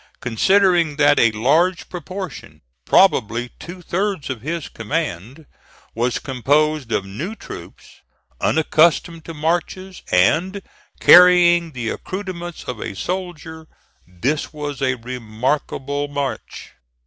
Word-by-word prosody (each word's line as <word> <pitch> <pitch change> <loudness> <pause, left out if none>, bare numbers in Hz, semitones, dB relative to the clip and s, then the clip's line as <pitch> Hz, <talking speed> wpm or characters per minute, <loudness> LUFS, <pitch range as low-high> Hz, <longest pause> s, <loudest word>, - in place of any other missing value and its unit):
Considering 175 - +2
that 145 0 +4
a 115 - +5
large 160 +11 +1
proportion, 180 - -8 0.2
probably 120 - +3
two 180 +1 -10
thirds 185 -6 -2
of 125 -4 -6
his 165 +3 -4
command, 130 - -4 0.5
was 120 +2 0
composed 145 +1 0
of 100 - 0
new 150 - -6
troops, - - -12 0.4
unaccustomed 160 +1 +2
to 165 - -9
marches, 175 +4 -2
and 170 - +2 0.4
carrying 175 -2 +6
the 120 -3 -3
accoutrements 185 - -6
of 125 -3 -6
a - - -5
soldier, 165 - -5 0.4
this 125 - -2
was 145 -2 -6
a 130 -1 +1
remarkable 130 +4 -3
march. 145 -1 -5
155 Hz, 110 wpm, -20 LUFS, 125-175 Hz, 0.5 s, carrying